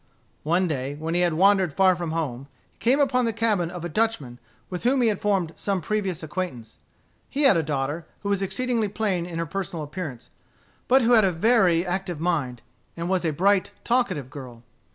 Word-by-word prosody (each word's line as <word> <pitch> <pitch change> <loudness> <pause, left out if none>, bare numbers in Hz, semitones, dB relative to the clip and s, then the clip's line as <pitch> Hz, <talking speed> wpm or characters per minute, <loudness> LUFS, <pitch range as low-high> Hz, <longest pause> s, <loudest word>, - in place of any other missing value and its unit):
One 175 +4 +1
day, 140 -2 -3
when 160 +2 -4
he 175 - +2
had 175 -3 +2
wandered 190 -3 +3
far 190 -1 +5
from 170 -1 -4
home, 140 -5 -3 0.2
he - - -38
came 255 +5 +3
upon 255 -3 +2
the 230 - +1
cabin 210 -6 +1
of 175 -1 -7
a - - -1
Dutchman 155 - -1 0.3
with 180 -1 -5
whom 260 +3 +2
he 230 - +4
had 205 - -2
formed 195 -6 +1
some 200 -2 -2
previous 190 -3 -2
acquaintance. 160 -8 -5 0.5
He 290 +2 -1
had 270 -8 +6
a 165 - +3
daughter, 150 +2 -3
who 200 - -3
was 200 -1 +1
exceedingly 225 +3 0
plain 195 -4 -1
in 170 -2 -6
her 170 - -1
personal 170 -1 -4
appearance, 150 -5 -7 0.6
but 260 0 +5
who 235 - +3
had 225 -3 +6
a 190 - +3
very 180 -2 +3
active 180 -2 -3
mind, 150 -9 -1 0.3
and 170 +1 -3
was 185 -2 +1
a 165 - +1
bright, 190 +5 +2
talkative 190 - 0
girl. 125 -5 -10
180 Hz, 200 wpm, -25 LUFS, 160-205 Hz, 0.6 s, had